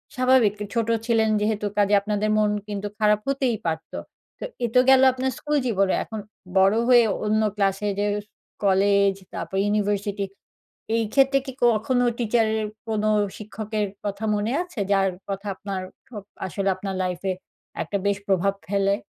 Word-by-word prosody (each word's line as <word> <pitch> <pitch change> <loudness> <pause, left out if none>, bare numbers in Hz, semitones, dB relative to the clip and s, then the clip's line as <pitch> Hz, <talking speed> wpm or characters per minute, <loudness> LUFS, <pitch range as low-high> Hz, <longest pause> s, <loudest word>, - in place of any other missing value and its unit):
স্বাভাবিক 255 -5 +4 0.2
ছোট 230 -2 0 0.2
ছিলেন 225 -2 +2
যেহেতু 210 0 0
কাজে 205 0 +3
আপনাদের 210 +1 -1
মন 210 -1 +3 0.2
কিন্তু 205 -1 -4
খারাপ 210 -1 +4
হতেই 270 -4 0
পারত। 160 -1 -3 0.5
তো - - -4 0.2
এ - - +4
তো - - +8
গেল 265 -1 +7
আপনার 260 +1 -1
স্কুল 300 0 -1
জীবনে। 195 -4 +2
এখন 220 - -7 0.4
বড় 195 +2 +5
হয়ে 245 -2 +7 0.2
অন্য 215 +1 +2
ক্লাসে 195 0 0
যে 205 - +1 0.6
কলেজ, 200 0 +4 0.2
তারপর 190 - -4
ইউনিভার্সিটি 205 -1 0 0.7
এই 230 - +2
ক্ষেত্রে 275 0 +4
কি 265 - -6
কখনো 240 +2 +2 0.2
টিচার 230 -1 +2
এর 215 - -2 0.2
কোনো 215 -1 +1 0.3
শিক্ষকের 215 0 -3 0.2
কথা 200 +1 -4
মনে 210 +2 -1
আছে? 355 -9 -10
যার 195 -1 +3 0.2
কথা 200 +1 -4
আপনার, 195 0 -5 0.3
ও - - -4 0.3
আসলে 195 +2 -1
আপনার 190 +1 -5
লাইফে 185 +1 -2 0.5
একটা 200 - -2
বেশ 200 -1 +1
প্রভাব 195 0 +2
ফেলে। 200 0 +2
210 Hz, 155 wpm, -24 LUFS, 195-225 Hz, 0.7 s, তো